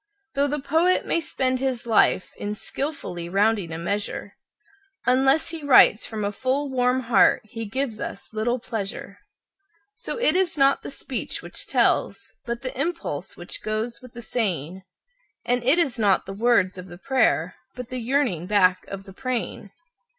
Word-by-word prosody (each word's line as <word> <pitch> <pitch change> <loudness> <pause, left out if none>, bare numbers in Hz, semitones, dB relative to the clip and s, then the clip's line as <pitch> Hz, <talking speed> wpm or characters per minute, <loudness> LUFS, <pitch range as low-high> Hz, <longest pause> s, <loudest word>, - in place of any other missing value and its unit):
Though 280 +1 +2
the 295 +1 -1
poet 325 +6 +2
may 335 - +1
spend 260 -4 0
his 260 -3 -1
life 220 -4 +3
in 205 0 -4
skilfully 195 - -4
rounding 200 -2 +1
a 160 - -4
measure, 200 +3 -3 0.7
Unless 270 +5 +4
he 325 -2 -5
writes 255 -6 +6
from 215 -2 -4
a 200 - -1
full, 265 +6 -1
warm 250 0 +2
heart 230 -5 +4
he 225 +1 -6
gives 230 +1 -3
us 195 - -6
little 230 +3 0
pleasure. 200 -4 -5 0.7
So - - -5
it 410 -9 +3
is 370 -4 +1
not 275 0 +4
the - - -7
speech - - -4
which - - -6
tells, - - +1
but 235 +1 -4
the 255 - -4
impulse 275 - -3
which 175 - -6
goes 220 +2 -3
with 255 -2 -14
the 235 - -9
saying; 190 - -2 0.6
And 245 0 +1
it 265 +7 +4
is 275 -9 +1
not 200 -3 +3
the 195 - -6
words 200 -4 +2
of 180 - -9
the 175 -1 -11
prayer, 220 -8 +1 0.2
but 250 -1 -7
the 255 - -4
yearning 235 - 0
back 185 -3 +3
of 195 0 -7
the 195 -1 -13
praying. 240 -2 -4
235 Hz, 170 wpm, -24 LUFS, 200-265 Hz, 0.7 s, writes